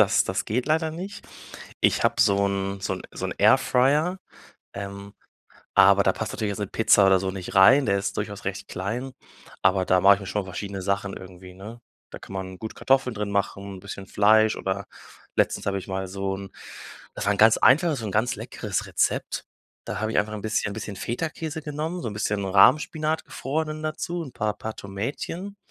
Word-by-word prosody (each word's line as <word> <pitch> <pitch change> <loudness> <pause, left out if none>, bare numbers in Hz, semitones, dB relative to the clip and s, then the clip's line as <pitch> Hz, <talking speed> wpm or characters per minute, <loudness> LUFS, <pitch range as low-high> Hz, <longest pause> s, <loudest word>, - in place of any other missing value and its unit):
das - - +4
das - - -2
geht 120 +4 -1
leider 160 +1 +1
nicht. 190 +5 -7 0.6
Ich - - +3
habe - - +2
so 100 0 +4
'n 100 0 -2
so 95 0 -2
'n 90 - -8
so - - -4
'n - - -3
Airfryer, 150 +9 +3 0.6
ähm, 100 0 -7 0.6
aber 100 +1 +6
da 95 - +3
passt 110 - -4
natürlich 105 -2 -2
jetzt 100 - -4
'ne 105 - -1
Pizza 105 -1 +4
oder 95 -1 +5
so 95 - -2
nicht 95 -1 -7
rein, 130 +9 +7
der 100 -1 +2
ist 100 0 -3
durchaus 100 -1 -4
recht 95 +1 -4
klein. 120 +8 -4 0.5
Aber 95 0 +3
da 90 0 +3
mache 100 +2 +7
ich 100 - -8
mir 100 - -8
schon 100 +1 -2
verschiedene 95 +1 -6
Sachen 100 0 -2
irgendwie, 90 0 -11
ne? 105 +5 -10 0.3
Da - - -8
kann - - -12
man 95 -1 -6
gut 110 - -7
Kartoffeln 130 -2 +1
drin 105 -1 -3
machen, 100 0 -2
'n - - -11
bisschen 100 0 -8
Fleisch 110 +2 +4
oder 95 +1 -3 0.5
letztens - - +1
habe 100 0 0
ich 95 - -9
mal 95 0 -3
so 95 0 -3
'n 100 -1 -9 0.6
das - - -4
war 100 - +4
'n 100 - -4
ganz 110 +1 +6
einfaches, 150 0 +4
so 110 - -5
'n 100 - -4
ganz 115 +3 +1
leckeres - - -4
Rezept. - - -1 0.4
Da - - -4
habe 110 0 -1
ich - - +2
einfach 105 +1 0
'n 105 - -6
bisschen 110 -2 -1
bisschen 105 -2 -6
Feta-Käse 155 - -4
genommen, 155 +4 -4
so 115 - -3
'n 105 - -6
bisschen 105 -1 -1
Rahmspinat, 155 +11 +3
gefrorenen, 155 +2 -3
dazu, 170 +2 -3
'n 135 -6 -9
paar 105 -1 -1
paar 110 0 -5
Tomätchen, 140 - -5
105 Hz, 205 wpm, -25 LUFS, 100-130 Hz, 0.6 s, rein